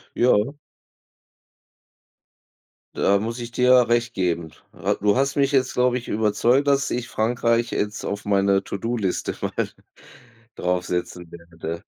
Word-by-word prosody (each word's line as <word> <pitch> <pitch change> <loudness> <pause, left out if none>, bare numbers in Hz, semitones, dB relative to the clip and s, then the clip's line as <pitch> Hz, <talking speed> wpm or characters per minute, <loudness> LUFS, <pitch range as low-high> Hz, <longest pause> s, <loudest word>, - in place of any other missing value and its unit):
Ja. 120 +1 +3 2.4
Da 100 0 +3
muss 115 +3 -4
ich 120 0 -6
dir 125 0 +4
recht 120 0 +1
geben. 85 -4 -1 0.2
Hat - - -2
du 105 0 +3
hast 135 +2 0
mich 140 0 +2
jetzt, 130 -2 +2
glaube 125 0 +2
ich, 120 - -8
überzeugt, 110 +6 +2
dass 140 0 +2
ich 125 0 -2
Frankreich 115 +1 0
jetzt 105 +1 -2
auf 100 0 -4
meiner 100 -1 +2
To-do-Liste 105 -1 -2
mal - - -2 0.9
draufsetzen 90 -1 -3
werde. 85 -1 -8
110 Hz, 125 wpm, -23 LUFS, 95-125 Hz, 2.4 s, dir